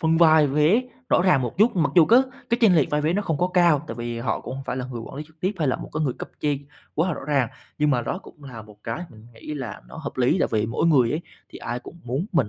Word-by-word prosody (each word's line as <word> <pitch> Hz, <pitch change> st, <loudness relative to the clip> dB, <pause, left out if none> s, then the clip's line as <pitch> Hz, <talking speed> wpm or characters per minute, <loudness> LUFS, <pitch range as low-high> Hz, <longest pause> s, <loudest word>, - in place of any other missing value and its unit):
phân 160 Hz, 0 st, +2 dB
vai 160 Hz, -3 st, +6 dB
vế 150 Hz, -, +3 dB, 0.3 s
rõ -, -, +4 dB
ràng 165 Hz, -8 st, +4 dB
một 120 Hz, -, -3 dB
chút, 215 Hz, +1 st, +4 dB
mặc 160 Hz, -5 st, +1 dB
dù 170 Hz, -3 st, +8 dB
cái 240 Hz, +3 st, +7 dB, 0.3 s
cái 235 Hz, -, +2 dB
chênh 205 Hz, -6 st, +6 dB
lệch 150 Hz, -, +2 dB
vai 150 Hz, -, +1 dB
vé 155 Hz, +2 st, +1 dB
nó 205 Hz, +3 st, 0 dB
không 160 Hz, -7 st, -2 dB
có 180 Hz, -, +1 dB
cao 170 Hz, -5 st, +4 dB
tại -, -, -5 dB
vì 120 Hz, 0 st, -4 dB
họ 115 Hz, -2 st, -2 dB
cũng 125 Hz, -, -6 dB
hông 135 Hz, 0 st, -7 dB
phải 125 Hz, -, -3 dB
là 125 Hz, -, -3 dB
người 120 Hz, -2 st, -6 dB
quản 115 Hz, -, -9 dB
lý 150 Hz, -, -4 dB
trực 160 Hz, 0 st, -26 dB
tiếp 185 Hz, +3 st, 0 dB
hay 150 Hz, -5 st, +1 dB
là -, -, +1 dB
một -, -, -9 dB
cái 155 Hz, -, -2 dB
người 135 Hz, -5 st, 0 dB
cấp -, -, -6 dB
trên 145 Hz, -1 st, -1 dB, 0.3 s
quá 165 Hz, +5 st, +1 dB
là 175 Hz, -, -1 dB
rõ -, -, -8 dB
ràng, 135 Hz, -5 st, +1 dB, 0.3 s
nhưng 150 Hz, 0 st, +3 dB
mà 125 Hz, -3 st, +1 dB
đó 180 Hz, -, -3 dB
cũng 150 Hz, -6 st, -16 dB
là 115 Hz, -5 st, -9 dB
một 105 Hz, -1 st, -16 dB
cái 120 Hz, +10 st, -4 dB
mình 110 Hz, 0 st, -15 dB
nghĩ 150 Hz, +6 st, -8 dB
là 125 Hz, -8 st, -6 dB
nó -, -, -11 dB
hợp 155 Hz, -3 st, -6 dB
lý. 130 Hz, +6 st, +3 dB
Tại -, -, +2 dB
vì 110 Hz, -1 st, +1 dB
mỗi 115 Hz, +8 st, 0 dB
người 130 Hz, -8 st, +4 dB
ấy 155 Hz, +5 st, -1 dB, 0.3 s
thì -, -, -11 dB
ai 120 Hz, +1 st, -4 dB
cũng 170 Hz, +7 st, -12 dB
muốn 135 Hz, -, -2 dB
mình 135 Hz, -, +2 dB
145 Hz, 310 wpm, -24 LUFS, 125-165 Hz, 0.3 s, dù